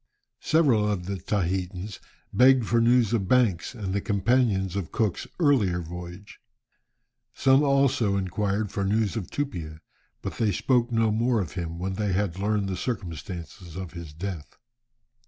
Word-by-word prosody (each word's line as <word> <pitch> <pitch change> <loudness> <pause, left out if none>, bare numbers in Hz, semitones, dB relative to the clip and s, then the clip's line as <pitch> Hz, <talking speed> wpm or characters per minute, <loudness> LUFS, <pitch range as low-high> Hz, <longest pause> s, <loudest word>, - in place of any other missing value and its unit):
Several 125 -10 +3
of 90 -4 -3
the 100 +1 -3
Tahitans 95 +1 -2 0.3
begged 130 -1 +5
for 115 +2 +2
news 120 -1 +4
of 100 -5 0
Banks 120 -3 +2
and 100 -5 -4
the 100 - 0
companions 100 -2 +1
of 95 -5 -3
Cook's 110 -5 -1
earlier 120 - +3
voyage. 90 +3 -9 1.0
Some 135 +1 +4
also 135 -8 +2
inquired 100 +2 -1
for 100 - -2
news 105 +1 +1
of 110 -6 -4
Tupia, 85 - -4 0.4
but - - -5
they 110 -3 +2
spoke 120 +4 +1
no 115 -1 +2
more 115 +2 +1
of 90 -6 -3
him 85 -2 -5
when 95 +2 -3
they 100 0 -1
had 95 -2 -1
learned 105 0 0
the 95 - -2
circumstances 90 -5 -6
of 95 -2 -6
his 85 -3 -8
death. 80 -3 -6
100 Hz, 155 wpm, -26 LUFS, 90-115 Hz, 1.0 s, begged